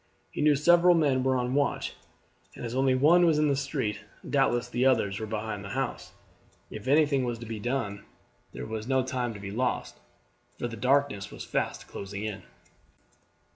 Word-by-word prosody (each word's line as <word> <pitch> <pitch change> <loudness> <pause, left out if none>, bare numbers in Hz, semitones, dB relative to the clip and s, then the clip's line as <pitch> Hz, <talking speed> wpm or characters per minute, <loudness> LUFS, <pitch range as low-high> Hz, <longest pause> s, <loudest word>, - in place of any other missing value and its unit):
He - - -4
knew 150 -1 +5
several 175 +4 +5
men 140 -5 +2
were 130 0 +2
on 125 0 -1
the 145 - +3
watch, 145 - -1 0.6
and - - -7
as 115 - -4
only 130 0 +2
one 160 +7 +5
was 165 -3 +4
in 150 0 +3
the 140 - +2
street, 135 -6 -2 0.3
doubtless 120 0 +1
the 120 +1 -1
others 105 -7 +2
were 110 - -4
behind 105 -1 -4
the 100 - -7
house. - - -3 0.6
If 110 +3 -8
anything 145 -1 +3
was 120 -1 -2
to 115 - -9
be 110 -1 -5
done 105 -4 -2 0.5
there - - -7
was 110 0 -5
no 130 -1 +2
time 125 -2 -2
to - - -8
be 100 0 -6
lost, 125 +4 -2 0.6
for 120 - -2
the 115 - -7
darkness 130 -4 +1
was - - -8
fast - - -2
closing 100 +1 -6
in. 105 -2 -4
125 Hz, 190 wpm, -28 LUFS, 110-140 Hz, 0.6 s, knew